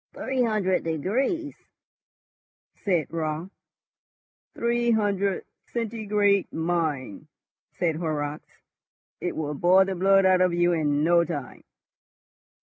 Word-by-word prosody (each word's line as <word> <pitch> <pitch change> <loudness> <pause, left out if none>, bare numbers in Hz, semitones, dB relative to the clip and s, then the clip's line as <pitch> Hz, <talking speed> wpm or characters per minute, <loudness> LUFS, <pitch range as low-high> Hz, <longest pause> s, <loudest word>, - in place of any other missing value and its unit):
"Three 260 -1 -2
hundred 205 -5 +1
degrees!" 255 - -1 1.2
said 175 -5 -1
Raut. 160 +2 -3 1.0
"Three 235 0 0
hundred 200 -3 +1 0.2
centigrade, 210 -4 0
mind!" 160 - -2 0.5
said 165 -3 0
Horrocks. 150 -3 -4 0.6
"It - - -3
will 150 -2 -3
boil 180 +5 +4
the 195 - -2
blood 195 +1 +4
out 185 -1 +4
of 180 -2 +2
you 175 0 +3
in 150 -3 +1
no 170 +1 +4
time." 150 -5 -6
180 Hz, 105 wpm, -25 LUFS, 160-205 Hz, 1.2 s, boil